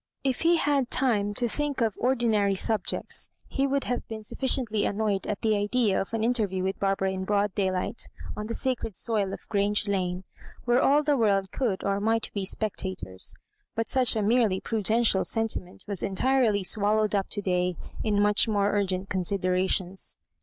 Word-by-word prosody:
If 265 -2 0
he 335 +1 +4
had 295 -2 +1
had 275 -4 +1
time 205 -6 +1
to 245 - 0
thmk 290 +4 -1
of 220 - -1
ordi 245 -1 +1
nary 200 -3 +2
subjects, 215 +1 0 0.2
he 275 +1 0
would 275 0 0
have 245 - -3
been 220 -1 -6
suflBciently 225 -1 0
annoyed 205 -2 -1
at 205 - -3
the 220 -1 +2
idea 205 0 +1
of 195 - -6
an 225 -1 -1
interview 210 -6 +1
with 190 +1 -2
Bar 195 0 +1
bara 195 -1 -1
in 190 0 -4
broad 205 0 0
daylight 190 +3 -1 0.3
on 210 - -5
the 230 - -3
sacred 245 -5 -1
soil 210 -4 0
of - - -8
Q 205 - 0
range 205 +1 +1
Lane, 185 -2 -1 0.4
where 245 +1 +3
all 290 +2 +4
the 295 -1 +2
world 200 -6 +1
could 225 -8 -1
or 200 0 0
might 225 +2 0
be 200 -2 -2
spectators; 185 - -3 0.4
but 225 0 -1
such 255 -3 +4
a 215 - 0
merely 215 -3 +2
prudential 220 -1 +1
sen 225 -1 +1
timent 180 -1 -6
was 200 -4 -1
entirely 220 0 +1
swallowed 210 +2 +2
up 195 -2 0
to 205 - -3
day 180 -1 0 0.3
in 210 -2 +1
much 210 +2 +3
more 205 -2 +1
urgent 190 -1 -1
considerations. 185 0 0
210 Hz, 190 wpm, -27 LUFS, 195-235 Hz, 0.4 s, he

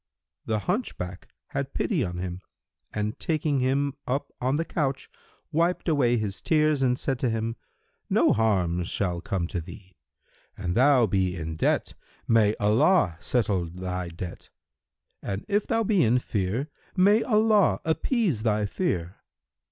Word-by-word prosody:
The 110 - +1
hunchback 95 - -3 0.2
had - - -4
pity - - 0
on 90 0 -4
him 90 0 -5 0.5
and 105 +1 -3
taking 155 -3 0
him 135 +2 +1
up 135 +3 -2
on 130 +3 +1
the 165 +2 0
couch, 140 -6 -2 0.4
wiped 170 +4 +1
away 130 -7 +3
his 105 -3 -3
tears 155 -3 +2
and 125 -2 +2
said 135 -2 -2
to 130 - +1
him, 115 0 -2 0.5
"No - - +4
harm 95 -6 +1
shall 85 0 -2
come 90 -1 -2
to 85 - -3
thee. 95 +3 -12 0.6
An 90 -2 -2
thou 130 +2 +5
be 95 -3 0
in 80 -2 -5
debt, 80 - 0 0.3
may 110 -2 +4
Allah 105 - +3
settle 100 -7 0
thy 90 +1 -4
debt: 85 +1 -8 0.7
and 100 +2 -4
if 205 0 +1
thou 225 0 +1
be 200 -4 +3
in 120 +1 +4
fear, 115 +5 -2 0.2
may 200 +4 +5
Allah 215 -4 +3
appease 165 - +1
thy 105 -2 +1
fear!" 95 - -2
115 Hz, 145 wpm, -26 LUFS, 95-150 Hz, 0.7 s, thou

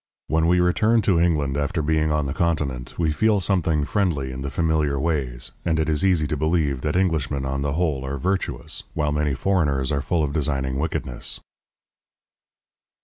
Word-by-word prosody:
When 80 +1 +1
we 90 +1 +4
return 110 +6 +3
to 90 -5 +3
England 75 -5 +1
after 75 +3 -1
being 80 0 +1
on 75 -1 +1
the 70 - -2
Continent, 75 -8 -1
we 80 -3 +1
feel 105 +6 +2
something 85 -6 +1
friendly 80 -9 0
in 65 +1 -6
the 70 - -3
familiar 75 -1 +1
ways, 65 -7 -2
and 80 -1 +1
it 80 - +1
is 80 +2 0
easy 90 -5 +3
to 75 - -1
believe 75 -3 0
that 75 +1 -1
Englishmen 75 -7 0
on 70 +1 -2
the 70 0 -1
whole 75 -5 0
are 70 +1 -3
virtuous, 90 -1 -2
while 75 -2 0
many 75 -2 0
foreigners 75 -9 +1
are 70 -1 0
full 85 +2 0
of 70 -1 -2
designing 70 -3 -1
wickedness. 75 -5 -3
75 Hz, 180 wpm, -23 LUFS, 70-85 Hz, -, we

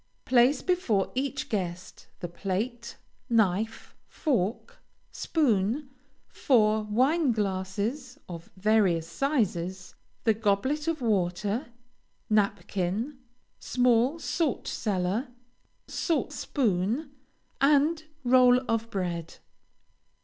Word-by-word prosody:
Place 255 +2 +4
before 300 - +1
each 270 +1 -2
guest, 180 -4 -4
the 175 - -3
plate, 210 +7 -4 0.3
knife, 220 -1 0
fork, 230 - -2 0.3
spoon, 265 - 0 0.4
four 220 -4 +2
wine 260 +8 +2
glasses 210 +6 -2
of 170 -2 -9
various 190 -5 +2
sizes, 190 - -1 0.3
the 225 - +4
goblet 225 +8 0
for 330 0 +1
water, 200 +3 0 0.6
napkin, 205 +4 0 0.4
small 250 +3 +2
salt 320 -3 -1
cellar, 200 +3 -1 0.6
salt 330 -3 -1
spoon, 235 - -1 0.5
and 300 +3 +3 0.2
roll 250 0 +6
of 225 0 -1
bread. 175 -5 -3
225 Hz, 85 wpm, -28 LUFS, 195-265 Hz, 0.6 s, roll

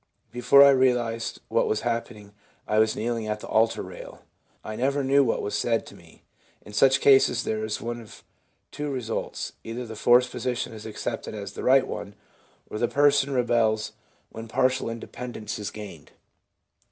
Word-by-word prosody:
Before 125 +3 +6
I 140 - +8
realised 125 -4 +1
what - - +1
had - - -3
happened, 115 -3 -4 0.3
I 105 - +2
was 110 0 +3
kneeling 115 -1 -2
at 105 0 -2
the - - -8
altar 115 +1 +2
rail. - - -11 0.4
I 110 - -6
never 140 +4 0
knew 140 +1 +4
what 120 - -1
was 105 - -4
said 115 -1 0
to - - -13
me/ - - -19 0.4
In 105 - -13
such 130 +5 +4
cases, 135 -3 +5
there 110 0 -2
is 110 0 -3
one 120 +1 -5
of 110 - -14 0.5
two 150 0 -4
results; 125 -5 -4
either 120 +2 -5
the 110 -1 -8
forced 125 +3 +4
position 125 -1 -3
is 110 0 -9
accepted 110 +1 -5
as 100 -1 -7
the - - -7
right 130 +1 +5
one, 100 - -7 0.5
or 105 - -6
the 120 - +2
person 140 0 +3
rebels 115 -4 +1 0.4
when 115 +1 -8
partial 130 +1 +1
independence 115 -1 -6
is 105 - -4
gained. 100 -8 -10
115 Hz, 175 wpm, -25 LUFS, 110-130 Hz, 0.5 s, I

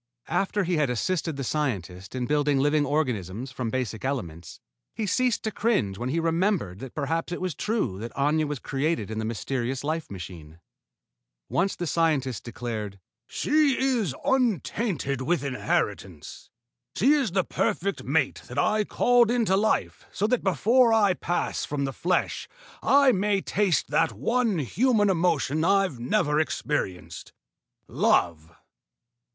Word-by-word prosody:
After 195 +3 0
he 175 -1 0
had 150 -3 +2
assisted 160 +6 -1
the 135 - -3
scientist 100 - -3
in 125 -1 -1
building 145 0 +1
living 145 +1 +2
organisms 125 - -2
from 125 -3 -3
basic 115 -3 -3
elements, 85 - -4 0.4
he 220 - -2
ceased 250 +3 +1
to 220 - -1
cringe 205 - 0
when 120 +1 -2
he 160 +5 0
remembered 165 - 0
that 135 0 -9
perhaps 160 +4 -2
it 175 - -3
was 185 -2 -2
true 210 - -2
that 115 +2 -6
Aña 150 +2 +1
was 145 0 -3
created 135 - -2
in 110 - -3
the 110 - -2
mysterious 120 +4 -3
life 155 +2 -2
machine. 85 -4 -9 0.9
Once 195 - 0
the 175 - -4
scientist 150 -7 0
declared, 110 -4 -5 0.3
"She 295 -3 +2
is 240 - 0
untainted 205 - 0
with 145 +2 0
inheritance. 135 -2 -3 0.5
She 265 +9 +4
is 270 - +1
the 190 -1 +2
perfect 195 +3 -1
mate 140 0 0
that 125 - -8
I 215 0 +2
called 240 +2 +3
into 230 -5 +2
life 215 +3 0
so 205 - -1
that 245 +2 +1
before 230 +6 +4
I 210 -4 +4
pass 175 0 -2
from 140 -1 -2
the 135 - -4
flesh 180 +6 -1 0.3
I 280 -1 +5
may 205 -1 +1
taste 195 -3 0
that - - +2
one 225 - 0
human 205 - +2
emotion 165 -4 +1
I've 195 -7 +2
never 150 +5 +1
experienced 90 - -3 0.5
love." 85 -2 +1
155 Hz, 145 wpm, -26 LUFS, 125-200 Hz, 0.9 s, I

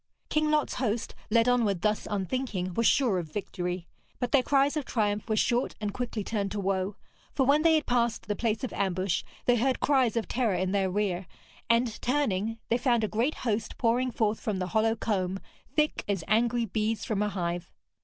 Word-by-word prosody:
King 305 0 +1
Lot's 305 -1 +1
host, 230 -2 -2 0.2
led 230 +2 +4
onward 225 -7 +2
thus 210 0 +1
unthinking, 195 -2 -2
were 230 - 0
sure 235 -6 +3
of 160 -3 -7
victory. 180 -2 -4 0.3
But 245 - -2
their 280 - +5
cries 280 +3 +2
of 300 - -1
triumph 210 -2 -1
were 215 - +2
short 240 +3 +1
and 210 -2 -3
quickly 235 -4 -3
turned 200 -2 -2
to 210 - -2
woe; 195 0 -1 0.4
for 265 - +3
when 285 +3 +4
they 325 0 +5
had 310 - +1
passed 235 -2 +1
the 210 - -1
place 225 0 -1
of 255 - -3
ambush, 185 -2 0 0.2
they 245 0 +4
heard 260 +3 +1
cries 260 -5 +2
of 230 - -1
terror 235 -6 +1
in 185 +1 0
their 195 -1 +1
rear, 190 -2 -1 0.4
and 230 -1 +2
turning, 225 -5 0
they 235 - +2
found 240 -3 +2
a - - +2
great 235 +9 0
host 220 -1 -1
pouring 245 +2 +2
forth 220 -2 0
from 210 -3 -2
the 185 0 -2
hollow 220 +4 +2
combe, 195 -4 -1 0.4
thick 300 0 +1
as 195 -5 -1
angry 235 +2 +2
bees 215 +1 -1
from 210 -2 -1
a 210 - +1
hive. 175 -2 -3
220 Hz, 200 wpm, -28 LUFS, 195-245 Hz, 0.4 s, their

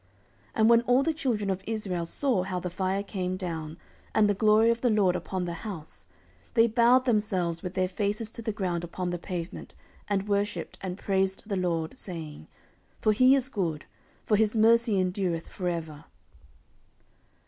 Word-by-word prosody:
14:007:003 95 - -35 0.5
And 220 +1 +4
when 235 0 +6
all 245 +3 +3
the 320 - +1
children 235 -10 -1
of 190 0 -4
Israel 195 -6 -2
saw 250 -1 0
how 185 0 -3
the 180 0 -5
fire 190 +2 -1
came 185 -2 -3
down, 165 -4 -5 0.4
and 215 -1 +5
the 205 - +3
glory 215 +2 +4
of 230 0 -2
the 245 - +3
LORD 200 -5 +3
upon 180 +1 -3
the 170 - -3
house, 180 -8 -8 0.5
they 230 -1 +6
bowed 235 +3 +4
themselves 190 -8 0
with 180 -1 -6
their 185 -1 +1
faces 210 +3 -2
to 230 - -8
the 220 -1 -2
ground 180 -4 -2
upon 175 +1 -4
the 175 - -3
pavement, 175 -1 -6 0.3
and 200 -1 -1
worshipped, 205 0 -2
and 185 -1 -4
praised 190 -1 0
the 205 -2 -2
LORD, 170 +2 -2
saying, 160 - -7 0.5
For 215 - +3
he 255 +5 +6
is 265 -2 0
good; 175 - -3 0.4
for 210 - +3
his 220 +1 +2
mercy 225 -1 +4
endureth 180 -2 -1
for 180 - -5
ever. 160 -3 -5
195 Hz, 180 wpm, -28 LUFS, 180-220 Hz, 0.5 s, when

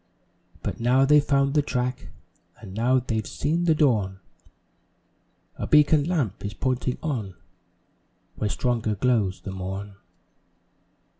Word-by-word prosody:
But - - -4
now 125 +3 +3
they've 150 +1 +5
found 140 -1 +2
the 150 - +4
track 125 -2 -3 0.5
And 100 -5 -10
now 120 +5 +2
they've 115 -4 -2
seen 165 +4 -1
the 160 -2 +4
dawn, 105 -11 +1 1.4
A - - -4
"beacon 150 -1 +5
lamp" 150 - -1
is 100 +1 -5
pointing 130 0 -1
on, 115 - -3 1.0
Where 105 - -2
stronger 115 -2 -1
glows 105 -4 +1
the 95 - -6
morn. 95 +2 -6
125 Hz, 125 wpm, -25 LUFS, 105-140 Hz, 1.4 s, they've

